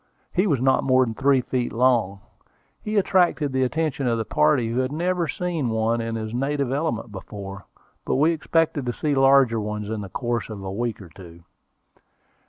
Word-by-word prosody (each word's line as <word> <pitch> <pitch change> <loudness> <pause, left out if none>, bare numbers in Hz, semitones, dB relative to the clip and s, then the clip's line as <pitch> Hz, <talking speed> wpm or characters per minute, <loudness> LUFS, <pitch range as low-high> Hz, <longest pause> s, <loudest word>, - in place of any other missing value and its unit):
He 190 +3 +2
was 145 -8 +1
not 130 +1 +2
more 130 -1 +4
than 115 - -4
three 135 +2 +3
feet 125 -1 -2
long. 115 -5 +1 0.6
He 215 0 -2
attracted 175 -7 +2
the 130 - +1
attention 140 0 -1
of 115 -1 +1
the 110 - -2
party, 90 +11 +2
who 120 +2 -1
had 130 +1 -1
never 175 +2 -1
seen 165 -6 -2
one 110 +1 0
in 115 0 -3
his 110 0 -5
native 135 +1 -1
element 135 -6 -2
before; 100 0 -8 0.4
but - - -1
we 150 +5 +4
expected 160 -4 0
to 120 - -1
see 150 +3 -1
larger 135 -4 +4
ones 105 0 -4
in 110 -1 -3
the 100 - -7
course 120 +4 -3
of 105 -3 -7
a 95 - -4
week 115 +2 -3
or 90 - -13
two. 85 0 -14
125 Hz, 190 wpm, -23 LUFS, 110-145 Hz, 0.6 s, more